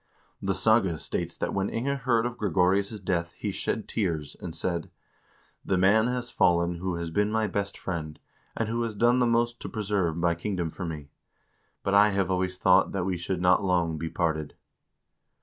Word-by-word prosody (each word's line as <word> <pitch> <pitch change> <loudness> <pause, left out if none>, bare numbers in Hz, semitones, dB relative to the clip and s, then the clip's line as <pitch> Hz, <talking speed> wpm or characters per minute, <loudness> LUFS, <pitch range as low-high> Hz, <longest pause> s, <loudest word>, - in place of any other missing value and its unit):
The 95 -1 0
saga 110 -7 +3
states - - -3
that - - -2
when 95 0 0
Inge 140 +4 -2
heard 115 -1 +2
of 120 0 -3
Gregorious' 100 +2 +1
death 85 -3 -2
he - - -4
shed - - -2
tears 80 -9 -2
and 85 -2 -6
said: 85 0 -2 0.4
" - - -35 0.3
The 95 - 0
man 105 +5 +4
has 125 -1 -3
fallen 85 0 +2
who 90 0 -3
has 85 -1 -4
been 105 +4 +1
my 110 0 +1
best 100 -1 -2
friend, 80 -4 -5 0.4
and 115 - 0
who 115 +2 -1
has 115 -2 -2
done 120 +4 +3
the 120 - +3
most 120 0 +1
to - - -6
preserve 100 -6 -1
my 85 0 +2
kingdom 85 -1 -3
for 90 - -6
me. 75 -3 -6 0.7
But 100 - 0
I 105 +1 +6
have 95 -1 0
always 90 0 -1
thought 95 0 +4
that 95 -3 -1
we 95 -1 0
should 90 +1 -3
not 90 +2 +4
long 85 -4 +1
be 80 - -3
parted." 80 -4 -2
95 Hz, 195 wpm, -27 LUFS, 85-110 Hz, 0.7 s, I